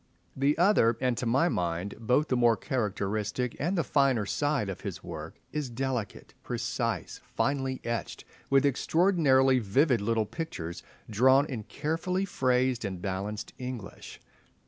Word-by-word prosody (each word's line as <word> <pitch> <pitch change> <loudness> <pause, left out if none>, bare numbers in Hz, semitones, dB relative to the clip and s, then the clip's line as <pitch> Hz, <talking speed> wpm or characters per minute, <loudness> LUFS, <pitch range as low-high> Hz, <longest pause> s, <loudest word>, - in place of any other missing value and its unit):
The 140 +2 +2
other, 170 - +4
and 125 -2 +1
to 125 - -2
my 135 +9 +3
mind 90 - -2
both 125 +7 +1
the 130 - +2
more 120 -2 +4
characteristic 105 +1 -2
and 175 +7 0
the 165 - +2
finer 135 -8 +2
side 145 -1 0
of 95 - -5
his 95 -2 -6
work, 80 -1 -7 0.2
is 150 -3 -3
delicate, 125 -2 -4
precise, - - -3 0.2
finely 135 -2 0
etched, 115 -1 -4 0.2
with 135 +1 +4
extraordinarily 140 -3 +3
vivid 120 +3 +2
little 110 +1 +1
pictures 90 - -6 0.3
drawn 130 +6 +4
in 120 -8 -5
carefully 165 +6 -2
phrased 130 -7 +1
and 95 -3 -4
balanced 100 +3 -4
English. 125 -5 -7
125 Hz, 140 wpm, -29 LUFS, 105-140 Hz, 0.3 s, other